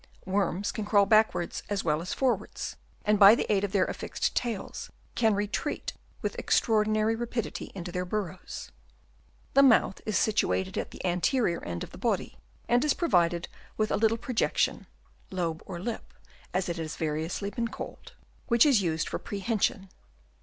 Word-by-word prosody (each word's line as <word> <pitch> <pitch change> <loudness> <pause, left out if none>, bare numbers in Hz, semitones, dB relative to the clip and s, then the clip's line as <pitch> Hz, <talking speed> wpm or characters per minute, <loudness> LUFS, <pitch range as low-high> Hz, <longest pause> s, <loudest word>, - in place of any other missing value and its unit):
Worms 195 0 0
can 215 - -4
crawl 205 -1 +4
backwards 215 -5 +2
as 205 -1 -1
well 155 -1 +1
as 180 - -5
forwards, 240 -6 -1 0.3
and 210 -1 +3
by 205 +2 +10
the - - -1
aid 195 -1 +1
of 200 - -1
their 195 -2 +3
affixed - - -2
tails 230 -5 -3 0.2
can 220 -3 +3
retreat 205 +1 -2 0.3
with - - -1
extraordinary 215 0 +2
rapidity 235 -1 -4
into 175 -2 -5
their 180 +1 -2
burrows. 185 -2 -5 0.8
The 275 - +7
mouth 245 -7 +4
is 215 -4 +1
situated 190 -3 +1
at - - -2
the - - -8
anterior 180 +2 +1
end 85 -1 -4
of - - -9
the - - -11
body, - - -1 0.3
and 240 +1 +3
is 300 - +2
provided 175 - +2 0.3
with 215 0 +1
a - - +3
little 225 +1 +2
projection 240 0 0 0.4
(lobe 170 -4 -2
or 175 - -5
lip, 225 +5 -5 0.4
as 185 +1 0
it 170 -1 -3
has 160 -2 -4
been 160 - -1
variously 160 +6 -2
called) 230 -1 -5 0.3
which 235 +1 +5
is 265 -8 +5
used 160 -3 0
for - - -3
prehension. 205 -1 -1
205 Hz, 165 wpm, -28 LUFS, 180-225 Hz, 0.8 s, by